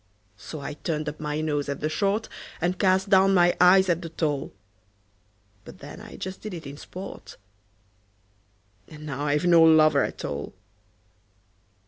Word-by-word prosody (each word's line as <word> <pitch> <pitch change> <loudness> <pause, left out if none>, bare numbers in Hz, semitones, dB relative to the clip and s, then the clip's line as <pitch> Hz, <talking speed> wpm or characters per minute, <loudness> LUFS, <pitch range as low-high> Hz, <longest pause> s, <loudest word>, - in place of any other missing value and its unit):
So 155 +5 -8
I 140 +1 -5
turned 150 0 -4
up 150 - -5
my 150 0 -3
nose 145 -2 -2
at 140 - -3
the 155 - -1
short, 200 +7 -1 0.3
And 180 +2 -1
cast 190 0 +2
down 195 0 +5
my 175 -1 +4
eyes 190 +1 +6
at 170 -1 +1
the 165 - -7
tall; 150 -3 -2 1.1
But - - -13
then - - -11
I - - -11
just 190 0 -7
did 215 -4 -6
it 165 - -9
in 140 0 -8
sport 185 +5 -10 1.5
And 150 0 -11
now 145 0 -4
I've 150 +3 +1
no 170 -2 +6
lover 160 -1 +5
at - - -5
all! 70 +4 -5
160 Hz, 160 wpm, -25 LUFS, 150-185 Hz, 1.5 s, eyes